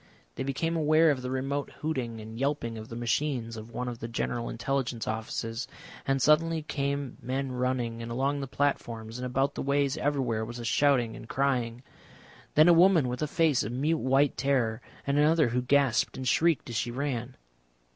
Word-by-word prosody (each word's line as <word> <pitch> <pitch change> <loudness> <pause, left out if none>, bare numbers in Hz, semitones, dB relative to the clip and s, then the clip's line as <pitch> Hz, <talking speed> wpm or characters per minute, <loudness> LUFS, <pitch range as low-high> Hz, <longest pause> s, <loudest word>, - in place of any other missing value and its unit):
They - - -6
became 140 +5 -1
aware 155 0 +4
of 135 -3 -2
the 125 - -4
remote 135 +2 -2
hooting 130 -7 -2
and 110 +1 -9
yelping 135 -4 -1
of 110 0 -8
the 115 - -7
machines 120 0 -1
of 110 +1 -8
one 125 +1 -4
of 120 -2 -5
the 115 - -5
General 120 0 -2
Intelligence 120 -1 -2
Offices, 115 +2 -3 0.4
and 135 0 +2
suddenly 160 +3 +3
came 140 -3 -3
men 130 +2 -2
running, 125 -2 -1
and 115 0 -6
along 135 +4 0
the 135 - -4
platforms 120 -5 -2
and 125 - -3
about 135 +3 0
the - - -4
ways 140 +1 +1
everywhere 135 -7 0
was 120 +2 -6
a 120 - -6
shouting 125 -3 +2
and 115 - -11
crying. 125 -3 0 0.7
Then 155 +2 +7
a 175 - +8
woman 170 -5 +5
with 125 0 -4
a 150 - +1
face 160 -5 +2
of 110 - -4
mute 150 +5 +1
white 135 +2 +2
terror, 125 -5 +1 0.2
and 140 +1 +1
another 155 -2 +4
who 125 +2 0
gasped 135 -2 +2
and 130 -1 -4
shrieked 160 -1 +2
as - - -5
she 115 +2 0
ran. 125 -1 -3
130 Hz, 190 wpm, -28 LUFS, 120-145 Hz, 0.7 s, a